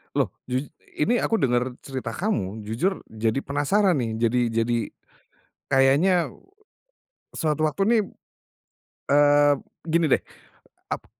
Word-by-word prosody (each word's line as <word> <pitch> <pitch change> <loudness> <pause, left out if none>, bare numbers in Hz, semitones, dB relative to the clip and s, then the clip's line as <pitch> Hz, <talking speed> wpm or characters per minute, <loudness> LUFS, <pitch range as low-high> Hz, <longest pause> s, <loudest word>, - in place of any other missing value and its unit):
Loh - - +1 0.2
jus 130 +3 -3 0.2
ini 235 +10 +2
aku 225 - +1
denger 125 - 0
cerita 130 -4 -5
kamu 110 - -2
jujur 120 - -2
jadi 110 +3 0
penasaran 160 +5 +1
nih 115 -3 -2
jadi 115 +2 +1 0.2
jadi, 120 0 0 0.9
kayaknya, 150 +6 +4 1.1
suatu 155 -2 +1
waktu 175 +6 -2
nih, 230 - +5 1.1
eee, 145 0 +5 0.3
gini 165 0 +2
deh - - +5 0.7
ap - - -4
140 Hz, 115 wpm, -24 LUFS, 120-170 Hz, 1.1 s, nih